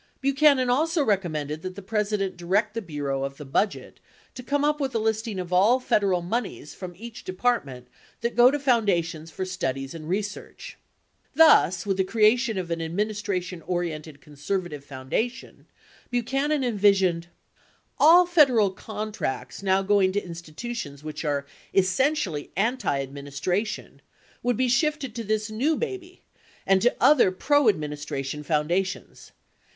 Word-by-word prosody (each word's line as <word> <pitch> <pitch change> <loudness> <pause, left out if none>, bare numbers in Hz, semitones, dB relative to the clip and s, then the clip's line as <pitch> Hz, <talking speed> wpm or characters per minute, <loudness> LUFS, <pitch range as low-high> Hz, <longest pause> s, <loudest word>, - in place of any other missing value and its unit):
74 - - -44
Buchanan 275 -1 +4
also 315 +4 +2
recommended 155 -7 -1
that 185 +1 -6
the 200 - -8
President 210 -1 -1
direct 195 +5 0
the 230 - -3
Bureau 145 -6 -3
of 135 0 -5
the 150 - -9
Budget 195 +10 -2 0.3
"to 255 - -8
come 285 +3 0
up 300 0 +1
with 270 -4 -2
a - - +4
listing 220 -1 -1
of 180 -1 -4
all 210 +8 +5
Federal 195 -7 +1
moneys 200 -5 -4
from 180 -2 -8
each 230 +3 -10
department 185 - -2 0.3
that 235 +1 -2
go 245 +1 +7
to 290 - 0
foundations 190 - 0
for 185 +4 -4
studies 135 -8 -3
and 160 -1 -8
research." 205 - -5 0.6
Thus, 200 - +5
with 195 -2 0
the 190 - +3
crea 215 +3 +4
tion 240 -4 -2
of 175 -2 -4
an 165 0 -2
administration 185 0 -3
oriented 160 -4 -4
conservative 150 +1 -4
foundation, 145 - -4 0.4
Buchanan 270 +4 0
envisioned: 195 -7 +2 0.7
All 345 +3 +7
Federal 270 - +4
contracts 205 - -5
now 195 0 +2
going 195 -1 +3
to 205 0 -1
institutions 170 - -7
which 155 +1 -6
are 145 -2 -1 0.3
essentially 190 - +1
antiadministration 145 - -2 0.4
would 245 -2 0
be 255 - +2
shifted 275 0 0
to 230 - -5
this 215 0 -1
new 275 +9 +1
baby 380 -5 -6 0.4
and 190 -1 +3
to 245 - +3
other 265 -7 +5
proadministration 150 - 0
foundations. 170 +5 -2
195 Hz, 140 wpm, -25 LUFS, 165-245 Hz, 0.7 s, go